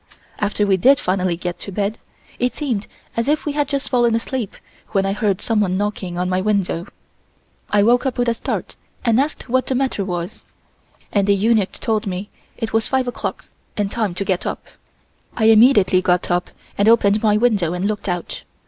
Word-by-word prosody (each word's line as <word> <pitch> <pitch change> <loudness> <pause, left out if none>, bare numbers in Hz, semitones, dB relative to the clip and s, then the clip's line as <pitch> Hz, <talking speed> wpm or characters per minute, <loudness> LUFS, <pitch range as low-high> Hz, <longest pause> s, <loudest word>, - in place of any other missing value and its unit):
After 205 0 0
we 195 -2 +3
did 270 +9 +5
finally 185 -2 0
get 175 0 -4
to 200 - -7
bed, 205 +3 -2 0.4
it 245 0 0
seemed 245 -9 -2 0.3
as 230 +2 -1
if 300 +1 +1
we 295 - 0
had 290 0 0
just 280 -1 -2
fallen 240 -3 +3
asleep 230 -1 -3 0.4
when 195 -2 +2
I 195 - 0
heard 205 -2 0
someone 205 -5 +1
knocking 200 -3 -3
on 180 +1 0
my 185 0 0
window. 195 -4 0 0.8
I 205 -1 +3
woke 245 +5 +3
up 260 - -3
with 245 0 +1
a 235 - +3
start 230 - -4 0.3
and 230 0 +4
asked 285 0 -2
what 260 +1 +1
the 260 - 0
matter 260 -6 0
was 175 -2 -5 0.7
and 200 -1 +1
a - - +6
eunuch 210 0 +2
told 220 -1 -1
me 190 +2 -4 0.3
it 225 -2 -4
was 225 0 +2
five 260 -1 0
o'clock 245 - -4 0.3
and 205 -1 -1
time 215 -6 -1
to 200 - -1
get 185 -2 0
up. - - -4 0.7
I 220 - +2
immediately 220 -4 +6
got 180 -1 +1
up 175 0 0 0.3
and 205 +2 +5
opened 210 -2 +4
my 210 -1 +3
window 210 -8 +2
and 180 +2 -2
looked 210 -1 -2
out. 175 -1 -4
210 Hz, 195 wpm, -20 LUFS, 190-235 Hz, 0.8 s, a